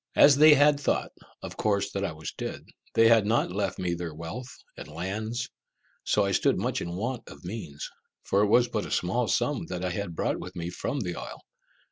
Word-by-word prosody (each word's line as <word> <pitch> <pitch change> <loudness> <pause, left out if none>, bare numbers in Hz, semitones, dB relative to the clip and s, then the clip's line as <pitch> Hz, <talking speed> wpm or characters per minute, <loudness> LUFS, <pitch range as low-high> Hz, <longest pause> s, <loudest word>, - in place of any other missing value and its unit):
As 145 -1 +8
they 155 0 +9
had 145 0 +5
thought, 145 - 0 0.3
of - - -7
course, 100 -1 +1
that 100 - -2
I 100 - -1
was 80 0 -6
dead, - - -5 0.3
they 115 0 +6
had 115 -3 +5
not 110 -5 +2
left 100 0 -2
me 90 -2 -1
their 85 -2 -5
wealth 110 +11 -7 0.2
and - - -9
lands, 110 +10 -3 0.6
so 105 - +2
that 100 - +1
I - - -1
stood - - +2
much - - -1
in 85 0 -4
want 115 +4 -4
of - - -13
means, 90 -7 -6 0.4
for 100 - +2
it 105 - +4
was 120 +4 +5
but 110 -3 -2
a - - -9
small 110 +7 0
sum 145 +3 0
that 90 0 -4
I 90 - -1
had 90 -2 -4
brought - - -1
with 90 +1 -8
me 85 0 -4
from 135 +9 -3
the 90 -4 -3
isle. - - -8
100 Hz, 220 wpm, -28 LUFS, 90-120 Hz, 0.6 s, they